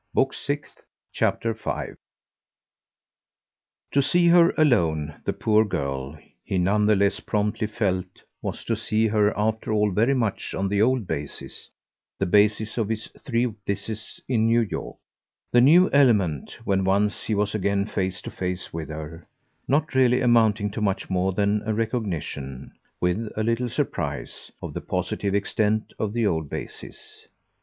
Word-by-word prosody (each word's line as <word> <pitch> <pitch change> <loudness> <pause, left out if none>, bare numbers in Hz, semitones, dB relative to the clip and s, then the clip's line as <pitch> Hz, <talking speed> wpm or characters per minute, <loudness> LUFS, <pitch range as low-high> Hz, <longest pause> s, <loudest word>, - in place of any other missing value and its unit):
Book 135 - +2
Sixth, 145 +1 -5 0.3
Chapter 115 -1 0
5 - - -4 2.0
To 140 - +3
see 170 +5 +3
her 170 0 +7
alone, 80 - +2
the - - +1
poor 110 0 +3
girl, 70 -6 -3 0.3
he 95 - -2
none 105 +4 +2
the 105 - +5
less 100 0 +2
promptly 105 +1 -1
felt, 95 -4 -2 0.2
was - - -5
to 115 - 0
see 110 0 0
her 105 -1 +3
after 110 +1 -1
all 105 -1 +2
very 115 +8 +2
much 115 -6 -2
on 95 0 -1
the 100 +1 +1
old 125 -1 +2
basis, 75 -4 -6 0.5
the - - 0
basis 105 +4 +2
of 110 -2 0
his 110 -1 -3
three 120 -2 0 0.2
visits 100 +2 -4
in 115 -3 +2
New 115 +1 +4
York; 110 - -4 0.5
the 120 - +6
new 170 +8 +7
element, 105 - +2
when 95 -1 +1
once 100 +2 +1
he 110 - 0
was 105 0 0
again 100 -1 +1
face 95 -3 -3
to - - -6
face 90 -1 -4
with 80 -1 -5
her, 80 +2 -7 0.4
not 150 +2 +1
really 125 -1 +4
amounting 110 -4 +3
to 105 - -5
much 100 -2 -1
more 95 +1 +1
than 100 +2 +1
a 110 - 0
recognition, 90 - -3 0.3
with 90 +5 0
a 110 - +1
little 115 +2 0
surprise, - - -3
of - - -5
the - - -4
positive 100 -1 -2
extent 105 +1 0
of 110 -2 -1
the 115 0 0
old 80 -6 0
basis. - - -8
105 Hz, 155 wpm, -25 LUFS, 95-115 Hz, 2.0 s, her